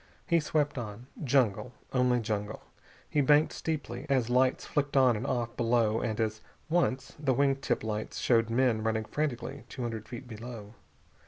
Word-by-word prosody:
He 170 -2 +3
swept 150 -3 0
on. 110 +1 -7 0.2
Jungle, 125 -3 +2 0.2
only 125 -1 +3
jungle. 105 -1 -3 0.4
He 150 - +1
banked 145 +3 +4
steeply 145 -4 -4
as 125 -4 +2
lights 130 +1 +3
flicked 140 -1 0
on 130 -3 +5
and 115 +6 -3
off 120 -3 -1
below 115 -2 +2
and 110 -1 -2
as 110 -1 -1 0.3
once 165 -6 +1
the 135 -4 +1
wing 135 0 +3
tip 135 - -1
lights 110 -1 -3
showed 115 -2 +3
men 120 -2 +2
running 110 0 0
frantically 140 0 -3
two 130 - -5
hundred 115 -2 -4
feet 120 +1 -7
below. 115 -2 -8
125 Hz, 165 wpm, -30 LUFS, 110-135 Hz, 0.4 s, on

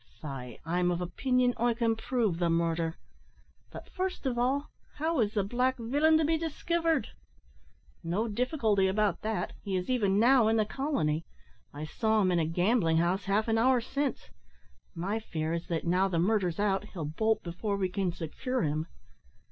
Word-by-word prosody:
faix, 130 -5 -7
I'm 175 +2 +1
of 175 -1 0
opinion 250 +8 +1
I 235 0 +1
can 230 -1 +1
prove 220 -6 -1
the 170 -1 +1
murder; 165 0 0 0.7
but, - - -10
first 370 -4 -3
of 255 -2 0
all, 265 +4 0 0.2
how 320 0 0
is 215 -2 +1
the 205 - +2
black 250 +5 0
villain 290 +7 +3
to 315 - +2
be 320 +1 +1
diskivered?" 330 -3 0 0.9
"No 185 +7 -1
difficulty 220 -4 +1
about 200 -1 +1
that. 220 0 -2
He 195 -2 -3
is 185 +6 -1
even 200 -6 +2
now 240 0 +5
in 220 - +3
the 215 - +2
colony. 205 - -1 0.5
I 150 +2 -6
saw 220 +7 +1
him 185 - +2
in 175 - +2
a 160 - +1
gambling 175 0 +2
house 180 +3 +1
half 205 +3 +1
an 225 0 +2
hour 255 +2 +4
since. 275 +4 -3 0.6
My 195 +6 -2
fear 160 -6 -3
is 170 0 -3
that, 165 -1 -2
now 180 +3 +3
the 180 -3 -1
murder's 180 -1 +1
out, 200 -1 +1
he'll 175 -7 -6
bolt 220 +9 0
before 200 +4 -3
we 190 -1 0
can 185 -1 -1
secure 180 +10 -3
him." 155 +2 -1
210 Hz, 180 wpm, -30 LUFS, 175-250 Hz, 0.9 s, now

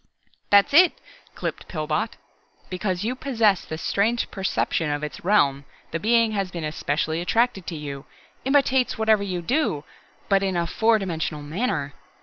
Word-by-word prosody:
"That's 205 +8 +5
it," 350 +4 +7 0.4
clipped - - -5
Pillbot. 155 +6 -2 0.5
"Because 185 0 -2
you 235 +3 -1
possess 230 -8 +1
this 160 +1 -6
strange 225 +4 0
perception 185 -4 -1
of 145 0 -2
Its 150 - -6
realm 145 -8 +3 0.3
the 165 - -2
Being 230 +3 +3
has 195 -3 -1
been 170 -2 -6
especially 155 +1 -1
attracted 225 0 +1
to 170 - -4
you, 140 -2 -6 0.4
imitates 265 -2 +2
whatever 220 -1 +3
you 185 -3 -3
do, 245 - 0 0.4
but 195 -1 +3
in 190 -2 0
a 170 - +1
four 220 +6 +2
dimensional 160 -6 -3
manner. 150 - -2
190 Hz, 150 wpm, -24 LUFS, 160-225 Hz, 0.5 s, it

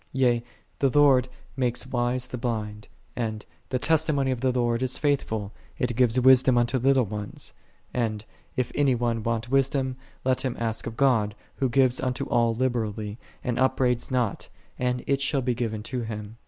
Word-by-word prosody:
Yea, 125 -3 +2 0.4
"The 135 - +3
Lord 135 -3 +4 0.3
maketh 130 0 0
wise 120 +1 0
the 125 - -6
blind:"8 105 -3 -3 0.3
and, 110 -3 -3 0.2
"The 130 - 0
testimony 145 -2 +2
of 125 -2 -3
the 130 -1 +2
Lord 120 -1 0
is 130 -1 +2
faithful, 110 -8 -1 0.3
it 125 -2 -1
giveth 125 0 +3
wisdom 130 0 +6
unto 120 +2 +2
little 135 0 +3
ones:"' 105 0 -6 0.4
and, 110 -3 -1 0.3
"If 125 -1 0
any 140 -3 +3
one 120 -1 -1
want 115 +2 -2
wisdom, 135 -1 +1 0.3
let 130 0 +2
him 130 -2 -2
ask 115 -1 -1
of 115 - -6
God, 115 -6 +2 0.2
Who 135 -2 +1
giveth 130 0 +3
unto 125 -1 -1
all 115 -1 +2
liberally, 110 -3 -2 0.2
and 125 -2 -1
upbraideth 125 -2 +1
not, 125 -5 -1 0.3
and 125 0 0
it 140 0 +1
shall 135 -1 +1
be 125 0 +1
given 110 -3 -3
to 125 +2 -3
him." 110 -1 -6
125 Hz, 170 wpm, -26 LUFS, 115-130 Hz, 0.4 s, wisdom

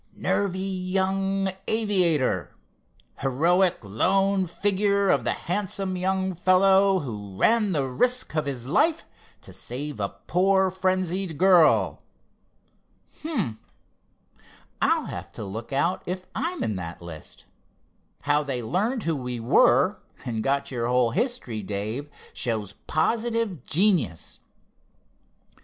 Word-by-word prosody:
'Nervy 195 -2 0
young 190 +1 -1 0.2
aviator,' 185 - +1 0.6
'heroic 170 +7 +2
lone 190 - +1
figure 200 +2 +1
of - - +3
the - - +1
handsome 190 0 -3
young 190 +1 0
fellow 190 +2 +4
who 105 -7 -7
ran 220 - +3
the 145 -6 0
risk 245 - 0
of 155 -2 0
his 125 -4 -4
life 320 - +2 0.4
to - - -12
save 145 +1 -6
a 100 -1 -1 0.2
poor 190 +1 +3
frenzied 185 -2 -1
girl.' 180 -3 +4 1.2
Hum! 220 - -2 1.2
I'll - - +2
have - - -7
to - - -7
look 110 +5 -7
out 165 +7 0
if 185 +1 -4
I'm 355 +2 -2
in 105 - -2
that 85 -1 -7
list. 80 -2 -11 0.8
How 145 +1 +2
they 135 -5 -3
learned 215 - -1
who 165 -1 0
we 125 -3 -4
were, 115 +2 +4 0.3
and 115 -3 -2
got 140 +1 0
your 120 -2 -2
whole 125 -1 +2
history, 215 - -2
Dave, 105 +8 -4 0.2
shows 110 -4 -3
positive 225 - 0
genius." 160 - +1
180 Hz, 115 wpm, -25 LUFS, 125-195 Hz, 1.2 s, fellow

